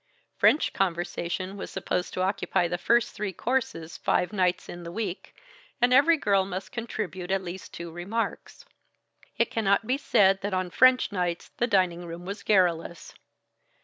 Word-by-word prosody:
French 305 - +3
conversation 175 +1 -2
was - - -6
supposed 180 -1 -2
to 185 - -2
occupy 185 -2 0
the 175 0 -3
first 235 +5 +2
three 205 -1 -3
courses 190 -8 -2
five 180 - 0
nights 185 -3 +1
in 175 - -8
the 170 0 -7
week, 195 -1 -5 0.4
and 245 +1 +4
every 320 +5 +6
girl 200 -8 +2
must 190 0 -6
contribute 210 -6 -5
at 190 0 0
least 180 +1 -7
two 170 0 -7
remarks. 195 +7 -4 0.7
It - - +1
cannot 205 -1 +1
be 260 +5 0
said 195 -7 +3
that 200 -1 -2
on 185 -1 -2
French 255 +1 +5
nights 180 -3 -2
the 240 - +1
dining 185 -5 +1
room 170 +1 -8
was 200 +2 -5
garrulous. 175 -4 +1
190 Hz, 160 wpm, -27 LUFS, 175-215 Hz, 0.7 s, every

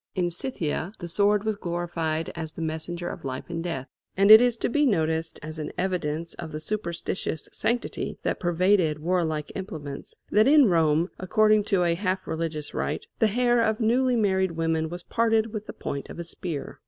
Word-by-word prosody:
In 175 -2 0
Scythia 170 - -3
the 175 - -6
sword 205 +4 +2
was 220 -1 0
glorified 170 -4 -2
as 160 -2 -5
the - - -7
messenger 160 +2 -4
of - - -6
life 130 -1 -5
and 165 0 -3
death. 140 -7 -4 0.3
And 200 +2 +6
it 220 +1 +12
is 245 -2 +2
to - - 0
be 295 +4 +2
noticed 160 -5 0
as 155 +1 -5
an 155 - -4
evidence 170 -3 -2
of 165 -2 -7
the 155 - -4
superstitious 170 -3 -3
sanctity 240 +1 -2
that - - -1
pervaded 175 -2 +2
warlike 160 -2 -1
implements, 155 -8 -7 0.2
that 215 +3 +5
in 285 -5 +7
Rome, 165 0 +2
according 215 +2 +3
to 195 -4 +2
a 170 -1 +2
half 185 +1 -2
religious 160 -2 -4
rite, - - -2
the 220 - +5
hair 240 +2 +2
of 220 -1 +1
newly 245 +3 +2
married 190 -5 +1
women 165 -1 0
was 175 +1 -7
parted 225 0 +1
with 215 -1 -5
the - - -5
point 140 - -5
of - - -8
a 170 - -4
spear. 165 -3 -5
175 Hz, 190 wpm, -26 LUFS, 160-210 Hz, 0.3 s, it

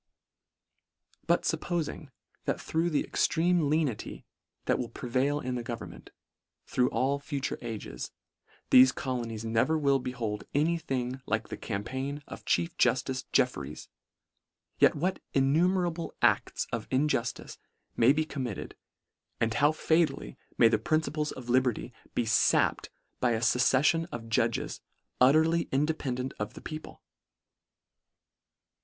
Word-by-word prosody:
But - - +3
fuppoling, 160 -4 -2 0.4
that - - -1
through 165 +2 0
the 150 - +1
extreme 175 +2 +2
lenity 150 -7 -1 0.4
that - - +1
will 120 - -3
prevail 130 +5 -1
in 130 -3 -3
the 125 - -2
government, 115 -1 -7 0.6
through 125 0 +1
all 140 +2 0
future 140 -1 -3
ages, 105 - -6 0.6
thefe 130 0 +8
colonies 115 -4 -3
never 115 +8 +2
will 140 -2 +3
behold 120 -5 -4
any 165 +4 +2
thing 130 -4 -3
like 110 0 -1
the - - -4
campaign 130 +7 -4
of - - -10
chief 85 -1 +1
juftice 130 -1 +1
Jeffereys, 75 - 0 0.9
yet - - +5
what 180 +6 -1 0.2
innumerable 170 +5 +1
acls - - +2
of 115 -2 -4
injuftice 130 -3 -1 0.4
may 120 +3 +5
be 155 +2 +1
committed, 130 -9 -5 0.6
and 115 -1 +1
how 145 +6 +4
fatally 160 - 0 0.2
may 115 - +7
the 115 - +2
principles 155 -1 0
of 125 -2 -9
liberty 125 -1 +1 0.2
be - - +2
fapped 115 - +2 0.3
by 120 -2 +2
a 110 - 0
fucceffion 135 +7 +3
of 115 -1 -7
judges 115 0 0 0.4
utterly 160 +5 +4
in 140 +2 +2
dependant 130 -5 -3
of 105 0 -4
the - - -9
people? 155 0 -8
130 Hz, 125 wpm, -29 LUFS, 120-155 Hz, 0.9 s, thefe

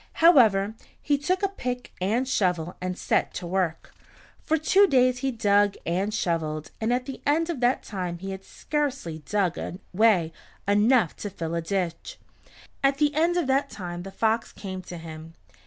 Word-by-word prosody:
However, 220 - +5 0.3
he 290 - +1
took 365 +7 -1
a - - +4
pick 250 -10 -5
and 225 +8 +1
shovel 180 -8 0
and 185 0 -3
set - - 0
to 180 - -4
work. 175 -2 -2 0.5
For 320 - +1
two 385 +6 +4
days 255 -4 +3
he 270 +1 0
dug 205 -4 +2
and 190 +5 0
shoveled, 160 -6 -2
and 220 +2 +1
at 250 +1 0
the 270 -1 -7
end 325 +4 +1
of 305 - -5
that 245 +1 +2
time 180 -4 -4
he 195 +2 -6
had 190 0 -7
scarcely 275 - -3
dug 185 +1 -1 0.3
away 185 -5 +3 0.3
enough 210 -1 +3
to 205 - -5
fill 165 -3 -5
a 170 - 0
ditch. 170 -1 -3 0.7
At 275 0 +3
the 295 0 +2
end 335 +4 +2
of 345 - +1
that 270 +2 +1
time 175 -3 -6
the 195 - -7
fox 225 +3 0
came 190 -2 -6
to 180 -1 -9
him. 160 0 -10
205 Hz, 175 wpm, -26 LUFS, 180-265 Hz, 0.7 s, However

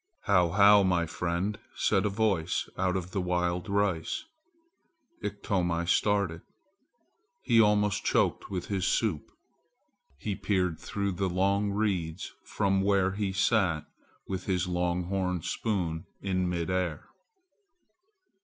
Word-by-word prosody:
"How, 90 -4 +3
how, 100 +3 +6
my 90 -3 +2
friend!" 90 +5 -2 0.2
said - - +2
a - - 0
voice 100 -5 0
out 95 0 0
of 90 0 -5
the 100 - -1
wild 90 +2 -1
rice. 100 - 0 1.0
Iktomi 95 -4 -1
started. 100 -3 +1 1.0
He 115 - +5
almost 105 -1 +2
choked - - +1
with 90 -3 -3
his 95 -2 -1
soup. 100 -10 0 0.9
He 105 +9 -3
peered 90 -6 0
through 100 -1 -2
the 95 +1 -1
long 100 +3 +1
reeds 95 -5 -2
from 95 -2 0
where 95 -1 +2
he 100 0 -2
sat 95 -6 +1 0.4
with 95 -2 -4
his 90 -2 0
long 90 0 -1
horn 90 -2 -2
spoon 90 -7 -2
in 95 -2 -1
mid 85 0 -2
air. 90 -5 -1
95 Hz, 125 wpm, -29 LUFS, 90-100 Hz, 1.0 s, how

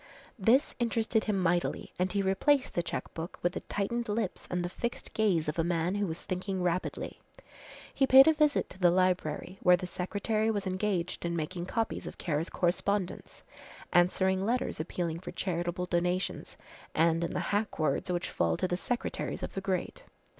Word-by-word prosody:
This 235 +8 +4
interested 225 -1 +1
him 210 -2 +1
mightily 175 -1 0
and 185 0 +1
he 200 +1 0
replaced 255 +9 +2
the 175 - +1
cheque - - -5
book 165 +1 -6
with 175 0 +1
the - - -3
tightened 235 +3 -2
lips 210 -2 -2
and 180 -1 -1
the - - 0
fixed 235 +6 -4
gaze 190 -8 +2
of 150 +2 -2
a - - +3
man 170 +1 0
who 205 -1 0
was 160 0 -5
thinking 185 0 -3
rapidly. 180 +1 -2 0.7
He 270 - +2
paid 265 +1 +9
a 320 - +7
visit 300 -2 +2
to 185 - -11
the 180 -2 +6
library, 185 0 0
where 180 -1 +6
the 180 - -5
secretary 205 +5 -1
was 205 -3 -1
engaged 185 -2 -1
in 170 0 -1
making 170 +2 -3
copies 225 +2 -2
of - - -8
Kara's 160 -1 -1
correspondence, 190 +2 -1 0.5
answering 190 +2 +3
letters 240 -2 -1
appealing 165 0 -2
for 185 - -8
charitable 175 0 -2
donations, 180 +1 -1 0.4
and 165 +1 +3
in 170 - -2
the - - -1
hack 210 +1 0
words 155 +2 0
which 175 -1 -1
fall 85 -1 +1
to - - 0
the 175 - -1
secretaries 240 +6 -3
of - - -4
the 195 - -3
great. 190 - -2
185 Hz, 180 wpm, -30 LUFS, 175-205 Hz, 0.7 s, paid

